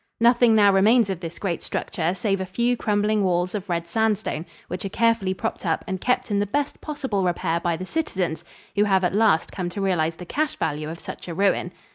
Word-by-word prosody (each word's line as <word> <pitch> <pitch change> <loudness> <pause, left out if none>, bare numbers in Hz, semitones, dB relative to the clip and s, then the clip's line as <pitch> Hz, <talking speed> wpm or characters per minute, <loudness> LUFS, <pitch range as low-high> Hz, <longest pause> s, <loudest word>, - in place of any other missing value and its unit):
Nothing 235 -1 +5
now 205 -2 +6
remains 210 +2 +4
of 185 - -4
this 170 -1 -7
great 175 -5 -2
structure 170 +2 -2
save 195 0 0
a - - -2
few 240 +6 +1
crumbling 210 -1 +1
walls 180 -1 +1
of 205 -2 -4
red 170 -1 -1
sandstone, 210 -4 -1 0.2
which 180 +1 -5
are 195 - -3
carefully 225 -3 +1
propped 225 +3 -4
up 165 -4 0
and 190 -1 -3
kept 250 -2 0
in 200 - +2
the 205 - 0
best 285 +7 -2
possible 265 -10 -2
repair 175 -1 0
by 170 -1 -1
the 185 - -5
citizens, 185 - -2 0.3
who 205 +1 +4
have 190 -2 +3
at 180 - +1
last 210 -6 +3
come 180 -3 -3
to 180 - -6
realize 170 -5 +1
the 180 - -9
cash 300 - -1
value 150 0 -2
of 165 +1 -7
such - - -8
a 170 - -5
ruin. 190 -2 +1
195 Hz, 220 wpm, -24 LUFS, 175-220 Hz, 0.3 s, now